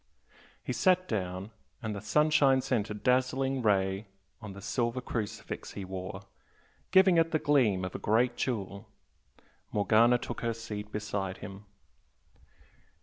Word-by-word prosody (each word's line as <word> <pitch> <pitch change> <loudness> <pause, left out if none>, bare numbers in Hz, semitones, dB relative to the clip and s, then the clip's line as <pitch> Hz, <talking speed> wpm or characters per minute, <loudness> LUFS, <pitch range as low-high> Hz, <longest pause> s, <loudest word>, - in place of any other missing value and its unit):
He - - -3
sat 185 -1 +3
down, 95 -1 -3 0.3
and 110 -1 -3
the 100 - -5
sunshine 140 +3 +3
sent 120 -5 -1
a 105 - -4
dazzling 130 +3 +1
ray 100 -2 +1 0.3
on 105 -3 -7
the 100 - -10
silver 120 +4 -1
crucifix 110 -3 -5
he 100 - -6
wore, 95 0 -6 0.7
giving 190 -2 +6
it 165 0 +4
the 160 - +1
gleam 120 -12 +2
of 95 - -5
a - - -5
great 120 +3 +2
jewel. 105 -3 -3 0.8
Morgana 110 +4 +4
took - - -6
her 115 -1 -1
seat 105 -2 -7
beside 100 -3 -3
him. 100 0 -10
110 Hz, 140 wpm, -30 LUFS, 100-130 Hz, 0.8 s, giving